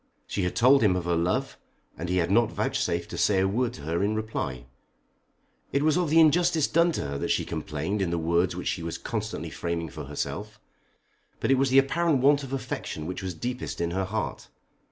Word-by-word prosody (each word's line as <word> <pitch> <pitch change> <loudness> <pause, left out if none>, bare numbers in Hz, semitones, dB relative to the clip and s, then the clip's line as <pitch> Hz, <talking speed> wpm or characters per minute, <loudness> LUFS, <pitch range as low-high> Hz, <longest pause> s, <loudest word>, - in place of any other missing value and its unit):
She 100 - -3
had 90 -1 -1
told 130 +4 +5
him 100 -5 +4
of 90 -2 -2
her 85 0 +1
love, 85 +2 -1 0.4
and 85 - -5
he 90 - +1
had 85 0 +1
not 115 +2 +3
vouchsafed - - -1
to - - -4
say 100 -2 +3
a 95 - +3
word 120 +5 0
to 75 - -10
her 80 +3 -1
in 105 +2 +1
reply. 85 - -3 1.1
It 140 - +1
was 155 -1 +3
of 180 -3 +1
the 160 +2 +5
injustice 165 0 +4
done 170 +1 +3
to - - -2
her 70 -1 -3
that - - -2
she - - +1
complained 80 +5 -3
in 95 - 0
the 85 - -1
words 85 +2 +1
which 90 - -5
she 85 - -1
was 85 0 -4
constantly - - -4
framing 85 -1 -3
for - - -8
herself; - - -5 0.8
but - - +1
it 135 - +5
was 135 0 +3
the 130 - +4
apparent 155 +3 +3
want 145 +1 +5
of 135 -2 -8
affection 125 - -4
which 90 +4 -4
was 95 -2 -4
deepest 125 +7 -4
in 85 0 -1
her 95 +2 -1
heart. 105 +3 -4
95 Hz, 220 wpm, -27 LUFS, 85-135 Hz, 1.1 s, told